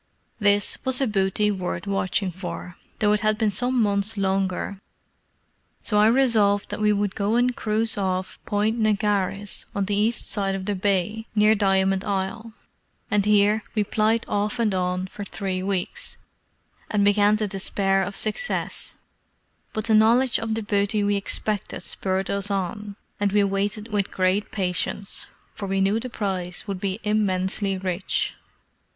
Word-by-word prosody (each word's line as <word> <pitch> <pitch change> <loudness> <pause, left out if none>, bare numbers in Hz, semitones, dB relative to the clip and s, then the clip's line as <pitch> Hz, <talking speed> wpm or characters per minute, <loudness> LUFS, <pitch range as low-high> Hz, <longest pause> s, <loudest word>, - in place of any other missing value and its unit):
This 205 -1 +2
was 260 -1 +2
a 270 - +2
booty 210 -1 +1
worth 185 0 -4
watching 195 -1 0
for, 180 0 -7 0.2
though 210 -1 +3
it 210 - +2
had 215 0 +1
been 220 -2 +1
some 245 +5 +1
months 205 0 +1
longer; 195 0 -1 1.0
so 210 -2 +1
I 210 - +6
resolved 225 -5 +3
that 205 +1 -4
we 210 0 +4
would 205 -1 0
go 205 +3 0
and 245 +1 +2
cruise 220 0 -1
off 185 -1 -2
Point 215 +2 0
Negaris, 205 -2 0
on 200 -1 0
the 205 +1 0
east 215 +3 +1
side 195 -2 0
of 190 -1 -5
the 205 - -1
bay, 200 +3 -1
near 210 +1 +5
Diamond 195 -2 +2
Isle; 200 +3 -3 0.6
and 205 -1 +2
here 210 +1 +4
we 210 - +2
plied 220 +2 +1
off 205 0 -1
and 225 -4 +1
on 180 0 -1
for 205 +2 -8
three 190 -2 -3
weeks, 195 - -3 0.7
and 205 -1 +2
began 205 +1 +4
to 215 -1 -1
despair 195 0 0
of 200 +1 -3
success; 220 - -1 0.8
but 215 -1 -3
the 225 - +3
knowledge 230 +4 +4
of 225 -1 -2
the 225 - -2
booty 205 +1 +1
we 205 0 +2
expected 205 +1 -2
spurred 190 0 -2
us 200 0 -2
on, 200 +1 -3 0.2
and 205 -1 +1
we 205 -1 +4
waited 205 +2 -1
with 200 -2 +1
great 185 +2 0
patience, 195 +1 -1 0.3
for 200 - -6
we 195 0 0
knew 195 +3 +2
the 255 +2 -5
prize 185 -6 -3
would 195 -2 -3
be 195 +1 -2
immensely 195 -2 +1
rich. 185 0 -1
205 Hz, 160 wpm, -24 LUFS, 195-215 Hz, 1.0 s, I